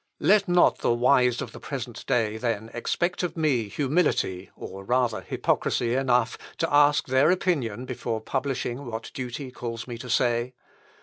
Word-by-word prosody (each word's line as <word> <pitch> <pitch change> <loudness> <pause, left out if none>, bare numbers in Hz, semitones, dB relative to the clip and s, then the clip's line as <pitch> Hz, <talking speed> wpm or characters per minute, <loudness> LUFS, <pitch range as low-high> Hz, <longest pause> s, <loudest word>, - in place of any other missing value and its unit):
"Let 205 0 +4
not 175 0 +4
the 120 - +2
wise 125 0 +3
of - - -8
the - - -10
present 125 -4 -6
day, 110 -2 +1
then, 115 -1 -2
expect 175 +9 -1
of 180 -1 -3
me 135 -9 +1
humility, 130 - 0
or 95 0 -8
rather 120 -1 +1
hypocrisy 115 +5 0
enough, 125 -3 +1 0.2
to 165 -2 -1
ask 145 0 +5
their 130 +4 +3
opinion 140 - 0
before 120 -3 -3
publishing 130 +1 -3
what 115 0 -6
duty 130 +1 -5
calls 115 -2 -5
me 120 -2 -6
to 125 - -8
say. 120 +1 +1
125 Hz, 160 wpm, -26 LUFS, 115-140 Hz, 0.2 s, ask